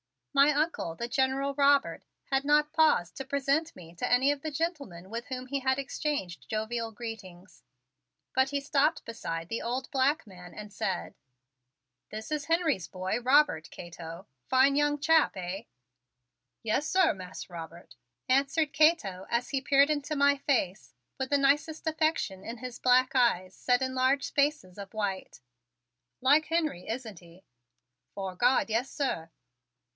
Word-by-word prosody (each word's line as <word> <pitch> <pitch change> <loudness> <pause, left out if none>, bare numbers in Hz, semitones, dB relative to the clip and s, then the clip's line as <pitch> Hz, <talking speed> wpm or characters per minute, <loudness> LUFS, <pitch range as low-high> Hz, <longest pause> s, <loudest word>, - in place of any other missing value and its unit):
My 280 +1 +6
Uncle, 300 - -1
the 235 - -4
General 270 +2 0
Robert, 280 0 +2 0.3
had 270 0 +2
not 295 +1 +3
paused 310 - +3
to 270 - -5
present 280 +3 0
to - - -16
me 170 -1 -13
any 260 +3 +3
of 290 -1 -4
the 315 - -3
gentlemen 280 - -4
with 235 +1 -4
whom 255 -1 -5
he 280 +1 -2
had 265 0 +1
exchanged 275 - -4
jovial 225 +1 -2
greetings, 195 -6 -9 0.7
but 265 +1 +3
he 285 0 -1
stopped 285 +3 +1
beside 165 -7 -5
the 230 - -3
old 255 +4 -3
black 280 +2 +1
man 180 -3 -13
and 210 -1 -9
said: 190 -3 -3 1.0
"This 220 +6 -7
is 300 -1 -2
Henry's 325 - +1
boy, 185 +4 -3
Robert, 250 - +3
Cato. 170 +1 -9 0.2
Fine 265 +2 +4
young 295 0 +2
chap, 320 +2 +4
eh?" 185 +2 -5 1.0
"Yes, 225 +7 0
sir, 375 -3 +4
Mas' 185 0 -9
Robert," 170 -2 -10 0.3
answered 280 +3 +2
Cato 280 - +2
as 235 +1 -1
he 270 -2 -1
peered 280 +2 +4
into 300 +1 -2
my 285 0 +4
face 220 -9 -1 0.3
with 265 0 -2
the 285 - +3
nicest 290 +4 +1
affection 310 -12 0
in 230 +2 -6
his 250 +1 -8
black 255 0 +4
eyes 190 -8 +2
set 250 +5 +1
in 260 0 -2
large 260 +2 +2
spaces 280 - -1
of 200 +1 -9
white. 195 -8 -3 0.8
"Like 290 +4 +4
Henry, 310 - -1
isn't 225 -5 -5
he?" 170 +2 -18 0.7
"'Fore 190 -2 -5
God, 245 +4 +3
yes, 235 +4 0
sir!" 165 - -2
260 Hz, 155 wpm, -29 LUFS, 195-285 Hz, 1.0 s, My